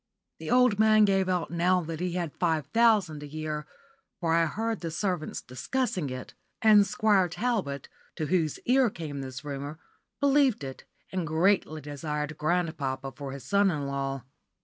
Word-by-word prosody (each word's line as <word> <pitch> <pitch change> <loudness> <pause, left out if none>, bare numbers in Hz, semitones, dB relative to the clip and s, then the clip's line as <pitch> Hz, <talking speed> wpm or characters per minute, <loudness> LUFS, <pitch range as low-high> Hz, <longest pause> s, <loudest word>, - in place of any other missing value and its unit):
The - - -6
old 250 -4 +4
man 215 -1 +6
gave 195 -2 +2
out 180 -4 -1
now 180 +2 +2
that 165 -1 -5
he 180 -1 -2
had 175 -4 -2
five 160 -4 +1
thousand 210 -7 +3
a 150 - -7
year, 150 0 -4 0.5
for 165 -2 +1
I 165 0 +4
heard 225 +6 -2
the 165 - -3
servants 180 -1 -2
discussing 185 - -2
it; 130 0 -7 0.3
and 210 -2 +6
Squire 195 -3 +3
Talbot, 185 - -2 0.3
to 155 - -2
whose 160 -2 +1
ear 255 0 +4
came 155 -7 -6
this 130 +2 -7
rumour, 145 +1 -5 0.4
believed 275 - +3
it, 135 -1 -8 0.3
and 185 -3 -2
greatly 160 -1 +2
desired 150 +1 -4
grandpapa 150 -5 -1
for 140 -1 -7
his 135 0 -8
son 200 0 +3
in 150 -5 -2
law. 135 -1 -3
165 Hz, 165 wpm, -28 LUFS, 145-200 Hz, 0.5 s, man